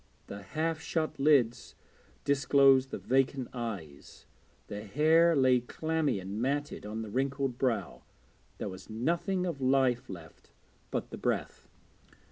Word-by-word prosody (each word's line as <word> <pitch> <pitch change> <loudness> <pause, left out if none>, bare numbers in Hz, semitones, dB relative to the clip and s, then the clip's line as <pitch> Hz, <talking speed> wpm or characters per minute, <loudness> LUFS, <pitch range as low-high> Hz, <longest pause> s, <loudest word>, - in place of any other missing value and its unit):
The 100 - -8
half 155 +9 -2
shut 160 -3 -2
lids 135 -5 +2 0.5
disclosed 135 -1 +4
the - - -4
vacant 135 0 0
eyes; 100 - -7 0.4
the 105 0 -7
hair 160 +9 +4
lay 130 -2 +4
clammy 155 -1 -1
and 100 +4 -5
matted 140 -3 -2
on 110 +1 -4
the 110 - -7
wrinkled 135 0 -1
brow; 115 -8 -1 0.6
there - - -4
was 95 +3 -9
nothing 170 - -1
of 165 -6 -4
life 130 -2 +2
left 85 -3 -11 0.4
but - - -3
the - - -7
breath. - - -2
130 Hz, 130 wpm, -30 LUFS, 110-145 Hz, 0.6 s, disclosed